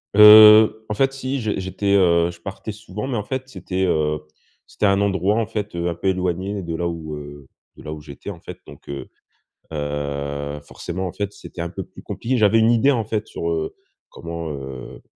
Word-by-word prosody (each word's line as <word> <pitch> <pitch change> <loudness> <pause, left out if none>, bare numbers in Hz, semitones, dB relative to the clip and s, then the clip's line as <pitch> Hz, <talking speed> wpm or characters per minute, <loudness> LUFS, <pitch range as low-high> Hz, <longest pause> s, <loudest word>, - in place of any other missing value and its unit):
Heu, 110 +1 +9
en - - 0
fait, 135 +3 +2
si, 135 0 -3
j'é 110 -4 -2
j'étais, 100 +2 -1
heu, 85 -2 +4
je 85 - -15
partais 95 +3 -6
souvent 105 +2 -7
mais 125 -4 -2
en 105 - -2
fait 130 +2 -4
c'était, 95 -7 -3
heu, 75 -3 0 0.4
c'était 105 - 0
un 100 +1 +3
endroit, 100 +1 +1
en 115 -1 +1
fait, 105 -3 -5
heu, 85 0 -1
un 85 - 0
peu 95 - -3
éloigné 95 +1 -1
de 85 -1 -4
là 85 +1 -1
où, 80 -2 -5
heu, 75 -1 -10 0.3
de - - -14
là 75 - -5
où 75 - -8
j'étais, 70 -2 -8
en - - -10
fait - - -9
donc - - -14
heu 70 -1 -6 0.6
heu, 70 -1 -3
forcément, 90 +5 -5
en - - -5
fait, 100 -1 -3
c'était 85 - -9
un 85 - -3
peu 95 +1 -6
plus - - -14
compliqué. 125 +2 -2
J'avais 110 +1 +4
une 110 +1 +4
idée, 130 +5 +4
en 115 -5 0
fait, 110 -1 -2
sur, 85 - -4
heu, 80 -1 -2 0.3
comment, 85 -1 -6
heu, 65 -2 -8
95 Hz, 215 wpm, -22 LUFS, 80-105 Hz, 0.6 s, Heu